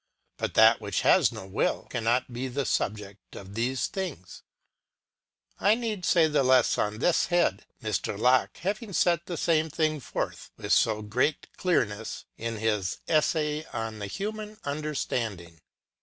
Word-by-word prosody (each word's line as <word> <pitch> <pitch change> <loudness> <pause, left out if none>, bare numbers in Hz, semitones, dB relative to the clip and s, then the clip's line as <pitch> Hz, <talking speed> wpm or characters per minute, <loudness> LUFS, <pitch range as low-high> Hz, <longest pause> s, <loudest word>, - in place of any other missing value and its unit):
But - - -3
that - - +6
which - - -1
has - - +5
no - - -8
will, 95 - -1
cannot 120 +1 0
be 125 +2 -3
the 135 +2 -2
subject 100 -3 -3
of 100 0 -10
these 125 +4 0
things. 165 - -6 1.2
ŌĆö - - 0
I 210 - +6
need 220 -6 -3
say 170 -3 +5
the 150 -2 +2
less 130 -1 +4
on 105 +1 0
this 165 +8 +2
head, 175 - +1 0.2
Mr. 110 -2 -2
Locke 125 +4 +3
having 205 +3 -3
set 170 -1 +2
the 175 - -4
same 160 -1 +2
thing 155 0 0
forth 130 - -4
with - - 0
so 110 -1 +3
great 125 +8 -1
clearness 110 - -1
in 115 0 -4
his 105 -4 -1
" - - -48
Essay 155 -1 +1
on 110 -1 -4
the 100 - -4
Human 210 - -5
Understanding." 115 - -3
130 Hz, 155 wpm, -27 LUFS, 110-165 Hz, 1.2 s, that